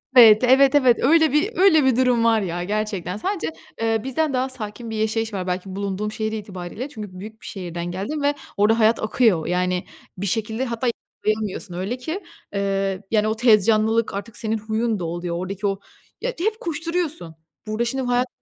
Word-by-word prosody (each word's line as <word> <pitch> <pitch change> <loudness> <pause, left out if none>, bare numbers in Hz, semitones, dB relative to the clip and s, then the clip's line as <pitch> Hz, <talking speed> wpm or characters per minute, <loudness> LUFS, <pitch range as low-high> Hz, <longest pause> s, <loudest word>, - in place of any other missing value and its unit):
Evet, 225 -2 +9
evet, 265 +2 +5
evet, 255 -4 +5
öyle 315 +2 +5
bir, 300 - +2
öyle 320 -7 +5
bir 260 - +4
durum 250 -2 +3
var 225 -1 +4
ya 175 -2 -3
gerçekten. 200 -2 -2
Sadece, 370 - -2 0.3
eee, 225 -1 +1
bizden 275 +2 0
daha 260 +1 0
sakin 230 -2 -6
bir 220 - -4
yaşayış 220 0 -1
var, 185 -2 -3
belki 185 +1 -3
bulunduğum 200 +1 -2
şehir 220 0 -2
itibariyle, 205 +3 -6
çünkü 210 -8 -8
büyük 220 +2 -10
bir - - -12
şehirden 175 -3 -5
geldim 205 +12 -3
ve 285 +1 +3 0.2
orada 215 +3 +3
hayat 220 0 +3
akıyor. 215 -7 +2
Yani 180 +1 0 0.3
bir 195 - -3
şekilde 220 +4 -1
hatta 235 0 -2 0.4
yakalayamıyorsun 215 -3 -1
öyle 190 +8 -3
ki, 320 +10 -4 0.3
ııı, 195 -1 -1
yani 215 -1 +3
o 220 - 0
tez 220 -4 +5
canlılık, 220 0 +2
artık 205 +3 -6
senin 225 -1 -1
huyun 220 0 -1
da 175 - -3
oluyor, 170 +1 -3
oradaki 195 +2 -3
o 195 0 -1 0.4
ya - - -1
hep 435 +5 0
koşturuyorsun. 330 - -3 0.3
Burada 215 +2 -1
şimdi 265 +3 -1
hayat 245 +1 +1
220 Hz, 185 wpm, -22 LUFS, 195-255 Hz, 0.4 s, Evet